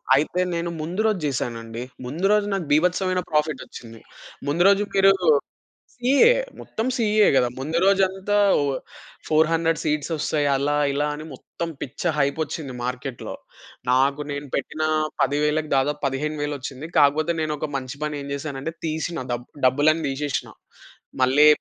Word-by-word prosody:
అయితే 155 +5 +1
నేను 170 0 -2
ముందు 175 +7 -2
రోజు 215 -4 +2
జేసానండి. 115 -4 -3 0.2
ముందు 155 +9 -3
రోజు 210 -1 +3
నాకు 190 -5 -2
బీభత్సమైన 180 +4 +2
ప్రాఫిటొచ్చింది. 145 -7 -3 0.5
ముందు 165 +5 +2
రోజు 200 +1 +4
మీరు 195 0 +6 0.8
సిఇఏ 270 - +5 0.3
మొత్తం 225 - -4
సీఇఏ 215 -2 +4
గదా! 125 - +4
ముందు 160 +5 -1
రోజంతా 195 +1 +2 0.2
ఓ - - +1 0.7
400 160 +1 +2
సీట్స్ 150 +1 -1
ఒస్తాయి. 150 -1 0
అలా 145 +2 0 0.2
ఇలా 145 +1 0
అని 155 +1 -7
మొత్తం 170 +5 -6
పిచ్చ 140 - -6 0.2
హైపొచ్చింది 140 -1 -1
మార్కెటులో. 125 0 -5 0.6
నాకు 140 +3 +3
నేను 145 0 -5
పెట్టిన 155 +3 -3 0.4
10,000 150 +2 +1
దాదాపు 145 +2 0
15,000 145 +2 -2
ఒచ్చింది. 135 +4 -7
కాకపోతే 155 +4 +3
నేను 155 -1 -1
ఒక 150 - -3
మంచి 135 +1 -6
పనేం 145 -2 -4
జేశానంటే 140 +2 -5
తీశినా. 160 0 -2
డబ్ 120 +1 -4 0.2
డబ్బులన్నీ 150 +5 +3
తీశేశినా. 140 0 -3 0.7
మళ్ళీ 135 +4 +5
150 Hz, 135 wpm, -23 LUFS, 140-170 Hz, 0.8 s, మీరు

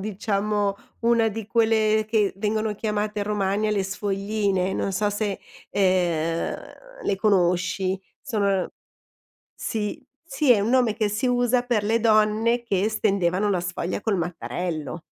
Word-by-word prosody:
diciamo, 205 0 -1 0.3
una 230 -1 +3
di 220 0 -6
quelle 220 -1 +2
che 210 -3 +2
vengono 215 +1 -1
chiamate 210 0 -2
in - - -1
Romagna 210 0 0
le 200 -2 0
sfogline, 195 -1 -1
non 195 - -1
so 205 +2 +1
se, 205 -1 -2 0.3
ehm, 175 -4 +1 0.5
le 200 - +1
conosci. 190 -1 +1 0.2
Sono 200 -8 0 0.9
sì, 215 +1 -3 0.2
sì, 285 -4 +2
è 225 - +5
un 210 - 0
nome 245 -4 +3
che 215 -1 0
si 210 +5 -1
usa 245 0 +2
per 240 -4 0
le 225 +2 +2
donne 220 +2 +3
che 205 -2 0
stendevano 200 -2 +1
la 185 - +1
sfoglia 175 +1 -3
col 205 -3 0
mattarello. 170 -1 -4
210 Hz, 140 wpm, -24 LUFS, 190-220 Hz, 0.9 s, è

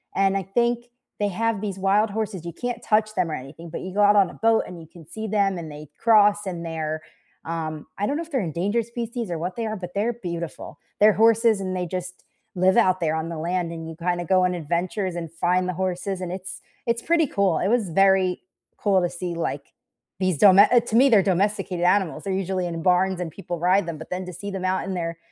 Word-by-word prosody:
and 195 0 +2
I 195 - -2
think 240 +4 0 0.3
they 205 - +1
have 225 +1 -1
these 195 -3 -4
wild 205 +3 +3
horses 200 -5 -4
you 170 - -4
can't 245 +2 -4
touch 215 0 +1
them 175 -4 0
or - - -3
anything, 150 +6 -8
but - - -5
you 185 0 -6
go 205 - +1
out 205 0 +6
on 195 -3 +5
a - - -11
boat, 225 0 +3
and 175 -2 -9
you 160 - -12
can 165 -1 -15
see 220 0 -5
them, 200 -3 +1
and 160 -3 -7
they 150 0 -10
cross, 210 -2 +4
and 175 -3 -4
they're, 155 -1 -3 0.4
um 160 -2 -4
I 205 - 0
don't 285 +5 -1
know 335 - -3
if 330 - -15
they're 265 - +1
endangered 195 +7 -1
species, 235 -3 -5
or 165 - -2
what 180 +3 -4
they 230 -1 -3
are, 215 0 -3
but 180 -2 -7
they're 225 +4 +1
beautiful. 170 -4 -6 0.2
They're 210 0 +6
horses 225 -1 +4
and 185 -1 -3
they 180 -1 -2
just 180 +1 -6 0.3
live 185 +2 +3
out 185 -5 +4
there 160 -2 0
on 160 +1 -3
the 165 - -5
land, 175 +1 -1
and 165 -1 -7
you 165 - -8
kinda 175 0 -2
go 185 +2 +3
on 180 - +1
adventures, 175 +3 -2
and 165 -2 -5
find 180 +2 +1
the 185 - -1
horses, 185 +1 -3
and 180 -1 -4
it's 190 +1 -7 0.2
it's 235 0 0
pretty 330 -1 +2
cool. 195 - +1
It - - 0
was 230 -5 +1
very 190 +1 +3 0.4
cool 195 -3 +2
to 175 - 0
see, 175 0 -5
like, 170 0 -4 0.5
these 185 -5 +1
dome 195 +3 +7
eh, 240 +4 +7
to 230 -1 -4
me, 270 +3 +6
they're 215 -4 +6
domesticated 195 -1 0
animals, 180 -2 +2
they're 195 - -3
usually 190 -1 -1
in 165 -1 -4
barns, 185 0 +2
and 175 -2 -3
people 175 0 -6
ride 180 +2 +3
them, 165 -2 -4
but 160 - -10
then 180 0 -3
to 180 - -7
see 200 +4 -6
them 190 -1 -5
out 185 -1 0
in 195 - -3
their 165 -2 -3
185 Hz, 245 wpm, -24 LUFS, 170-210 Hz, 0.5 s, dome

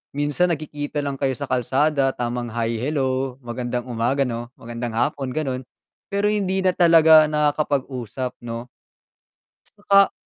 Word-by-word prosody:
minsan 145 +5 +1
nagkikita 150 -2 -3
lang 140 -1 -3
kayo 135 -2 0
sa 145 - -6
kalsada 135 +2 +1
tamang 120 0 -3
"Hi, 115 -1 -1
hello, 130 -1 -1
magandang 120 +1 -3
umaga." 125 +3 0
'No? 120 -1 -4
"Magandang 115 0 -6
hapon." 130 +3 -1
Gano'n. 130 -4 -3 0.4
Pero 205 +1 +1
hindi 190 -2 0
na 185 - +4
talaga 160 -3 +6
nakakapag-usap 135 -5 -1
'no? 120 +1 -7 0.9
'Tsaka 200 -1 +3
135 Hz, 130 wpm, -22 LUFS, 120-155 Hz, 0.9 s, talaga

